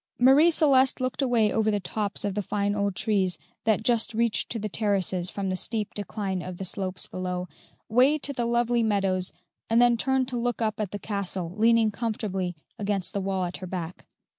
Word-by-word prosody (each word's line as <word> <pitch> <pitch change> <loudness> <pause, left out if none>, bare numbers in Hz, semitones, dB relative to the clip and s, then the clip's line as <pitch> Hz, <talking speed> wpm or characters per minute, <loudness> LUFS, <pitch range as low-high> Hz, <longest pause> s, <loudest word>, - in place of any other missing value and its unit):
Marie 270 +7 +6
Celeste 275 -5 +4
looked 255 +2 -2
away 235 -5 +3
over 220 -1 +1
the 205 -1 +1
tops 205 +2 -3
of 200 - -1
the 205 - -1
fine 205 +1 -1
old 200 -2 -1
trees 195 -3 +1 0.3
that 220 -1 +2
just 230 -1 +1
reach 230 -1 +1
to 235 - -4
the 215 -1 -3
terraces 190 -4 0
from 195 0 -3
the - - 0
steep 215 +2 -2
decline 200 -2 -3
of 180 0 -7
the 190 - -5
slopes 185 0 -3
below, 180 0 -4 0.4
way 255 +7 +4
to 285 -1 -1
the 240 -2 -1
lovely 240 0 +2
meadows, 195 -4 +1 0.4
and 225 +1 +4
then 240 -1 +5
turned 265 +1 +1
to 250 - -3
look 245 +1 -1
up 215 -2 -1
at 210 -3 -1
the 205 - -5
castle, 195 -4 -4
leaning 225 0 +4
comfortably 200 -5 -3 0.2
against 200 -2 -1
the 200 - -1
wall 190 -1 -1
at 175 - -5
her 185 - -7
back. 175 -1 -6
210 Hz, 200 wpm, -26 LUFS, 190-235 Hz, 0.4 s, Marie